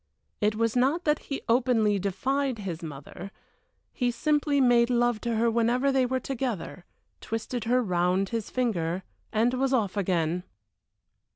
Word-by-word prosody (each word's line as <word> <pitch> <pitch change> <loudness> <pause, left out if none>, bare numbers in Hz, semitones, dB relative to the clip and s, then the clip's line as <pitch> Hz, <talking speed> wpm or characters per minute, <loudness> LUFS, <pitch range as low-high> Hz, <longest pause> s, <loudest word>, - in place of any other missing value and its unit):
It 210 0 +1
was 230 +1 0
not 275 +8 +2
that 300 -1 +2
he 275 - -3
openly 230 -4 +2
defied 260 +7 -1
his 185 -6 -5
mother 155 +4 -8 0.6
he 245 -2 0
simply 295 +2 +1
made 240 -2 +4
love 240 -2 +1
to 235 -1 -1
her 230 +1 +2
whenever 240 +4 +2
they 265 -2 +2
were 260 +1 0
together, 240 -9 -4 0.3
twisted 225 +1 -4
her 250 +2 +2
round 180 0 +1
his 230 -3 -3
finger, 190 -8 -1 0.3
and 230 +3 +2
was 265 +1 0
off 215 -7 +1
again. 175 -3 0
235 Hz, 150 wpm, -27 LUFS, 195-255 Hz, 0.6 s, made